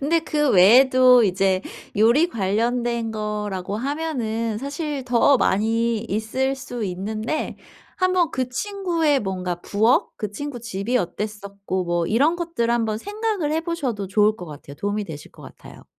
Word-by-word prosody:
근데 320 +4 +2
그 295 -3 0
외에도 250 +5 +6
이제 190 0 +1 0.4
요리 235 +11 +4
관련된 235 - -1
거라고 210 -3 -3
하면은 235 -5 -2
사실 285 0 -4
더 250 +3 +4
많이 225 +2 +1
있을 230 +5 -2
수 245 -4 -6
있는데 215 +9 -3 0.4
한번 370 -2 +2
그 255 -1 -2
친구의 335 -2 0
뭔가 185 -3 -3
부엌, 220 +4 +2
그 210 - -4
친구 250 +3 -6
집이 235 +2 -2
어땠었고 200 -1 -3
뭐 175 -1 0
이런 285 - +2
것들을 330 -10 -1
한번 220 -2 0
생각을 415 - -2
해 320 - +1
보셔도 280 - -3
좋을 210 +2 +2
것 180 - -9
같아요. 145 -1 -10
도움이 205 +3 -2
되실 155 -5 -9
것 - - -15
같아요. - - -13
230 Hz, 295 characters per minute, -22 LUFS, 205-280 Hz, 0.4 s, 외에도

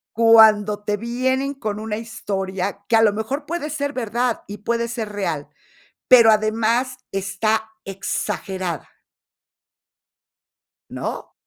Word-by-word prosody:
Cuando 215 -2 +6
te 210 0 -1
vienen 260 +5 -1
con 215 -6 -4
una 215 0 -4
historia 200 -3 -4
que 230 - +4
a 225 - +5
lo 215 -2 +5
mejor, 260 +8 -4
puede 320 -2 -3
ser 285 -1 -2
verdad 240 -1 -1
y 205 +1 -7
puede 235 +3 -1
ser 225 -2 -4
real, 170 -8 -3 0.6
pero 235 -3 +8
además 225 +4 +1
está 200 +3 -1 0.2
exagerada. 190 -3 -4 2.0
¿No? - - -5
220 Hz, 115 wpm, -21 LUFS, 205-240 Hz, 2.0 s, pero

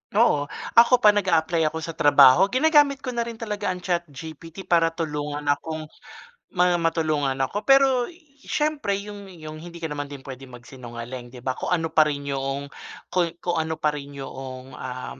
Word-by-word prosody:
Oo, 150 -11 +3 0.3
ako 240 0 +5
pa 210 - +9
nag-a-apply 170 -5 +1
ako 160 +1 -4
sa 165 - -4
trabaho 145 +2 +6
ginagamit 285 +2 +3
ko 255 - -3
na 235 -1 -2
rin 235 - -6
talaga 210 -2 -4
ang 180 -1 -3
ChatGPT 165 0 -5
para 170 -2 +3
tulungan 150 -2 -3
akong 155 +2 -3 0.7
ma 180 0 +4
matulungan 155 -5 0
ako. 170 +11 -1
Pero, 270 -2 +5 0.4
siyempre 300 -9 -1
'yung 205 -1 -9
'yung 155 -2 -9
hindi 170 +1 -10
ka 160 - 0
naman 145 -1 -4
din 140 - -7
puwedeng 130 -1 -10
magsinungaling 120 0 -9
'di 125 - -11
ba, 130 - 0
kung - - -4
ano 165 -2 0
pa 155 - +7
rin 145 -1 -3
'yung 135 +1 -3 0.4
kung 180 -2 +2 0.2
kung 175 -1 0
ano 160 0 -2
pa 150 - +2
rin 145 -1 -8
'yoong, 130 -1 -8
um, 130 0 -7
160 Hz, 175 wpm, -24 LUFS, 140-200 Hz, 0.7 s, pa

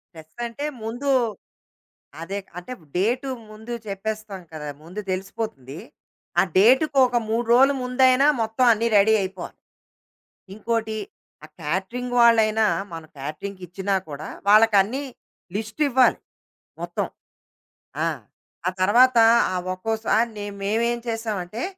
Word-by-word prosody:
Stress 160 +8 -9
అంటే 260 +5 -6 0.2
ముందు, 245 +5 -3 1.1
అదే 195 +4 -4 0.2
అంటే 180 +8 -7 0.2
డేటు 245 +8 0 0.2
ముందు 220 +3 -8
చెప్పేస్తాం 205 0 -5
కదా! 150 -1 -7 0.2
ముందు 180 +6 -8
తెలిసిపోతుంది. 185 - -5 0.6
ఆ - - +7 0.2
డేట్‌ 250 +10 +6
కొక 255 -2 +4 0.2
3 230 +2 0
రోలు 270 +3 +6
ముందైనా, 255 +2 +4
మొత్తం 225 +3 +1
అన్నీ 230 +2 0
రెడీ 215 +2 +5
అయిపోవాలి. 190 -2 -6 1.0
ఇంకోటి, 220 -1 -2 0.5
ఆ - - -10
కేటరింగ్ 190 +11 -3
వాళ్ళైనా 220 -2 +5 0.3
మనం 165 -1 -8
కేటరింగ్‌ 155 +8 -6
కిచ్చినా 190 +3 -2
కూడా 145 +1 -7 0.2
వాళ్ళకి 215 +1 +6
అన్ని 255 +8 -3 0.5
లిస్ట్ 220 +7 -6
ఇవ్వాలి. 260 -1 +4 0.6
మొత్తం. - - -2 1.0
ఆ! - - +2 0.6
ఆ - - +4
తర్వాత, 245 +6 +5 0.4
ఆ - - -2 0.2
ఒక్కోసారి 220 +3 0
నె 205 - -5 0.2
మేమేం 235 +3 0
చేసామంటే, 220 -2 -4
220 Hz, 115 wpm, -23 LUFS, 190-240 Hz, 1.1 s, ఆ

